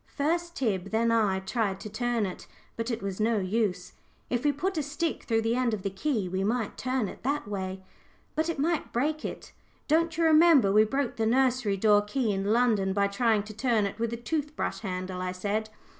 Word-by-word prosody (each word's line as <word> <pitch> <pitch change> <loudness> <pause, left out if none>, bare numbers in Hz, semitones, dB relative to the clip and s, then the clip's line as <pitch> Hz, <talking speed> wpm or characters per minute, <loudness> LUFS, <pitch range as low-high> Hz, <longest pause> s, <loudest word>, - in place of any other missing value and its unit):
First 340 +4 -1
Tib, 200 -8 -1
then 230 +2 +2
I, 205 -4 +2
tried 195 -1 -1
to - - -6
turn 240 0 0
it, 185 - -7 0.3
but 230 +1 -3
it 230 -3 -3
was 195 0 -4
no 220 +1 +2
use. 190 -2 -1 0.4
"If 245 0 0
we 295 - +4
put 330 +5 -2
a - - +1
stick 300 +3 -3
through 225 -1 +1
the 225 +1 +1
end 245 -3 +1
of 195 - -9
the 195 - -2
key, 210 -1 -1
we 190 +1 -2
might 225 +1 -1
turn 255 -3 -1
it - - -9
that 280 -2 -1
way." 190 -2 -4 0.5
"But 315 +2 0
it 335 - -2
might 315 +3 0
break 300 +6 -1
it; - - -6 0.4
don't 325 +1 +2
you 335 - +2
remember 315 -9 +6
we 215 +2 +6
broke 270 +3 -2
the 220 -1 +1
nursery 250 -4 +2
door 205 +1 +5
key 215 +2 -1
in 195 0 -2
London 215 -3 +2
by 200 0 +2
trying 220 0 +2
to 215 +1 -9
turn 225 -2 +1
it 200 +2 -5
with 230 0 -1
a 235 - -3
tooth 300 +4 -3
brush - - -2
handle?" 185 -2 -4
I 180 0 -2
said. 210 +4 -2
225 Hz, 220 wpm, -28 LUFS, 200-270 Hz, 0.5 s, remember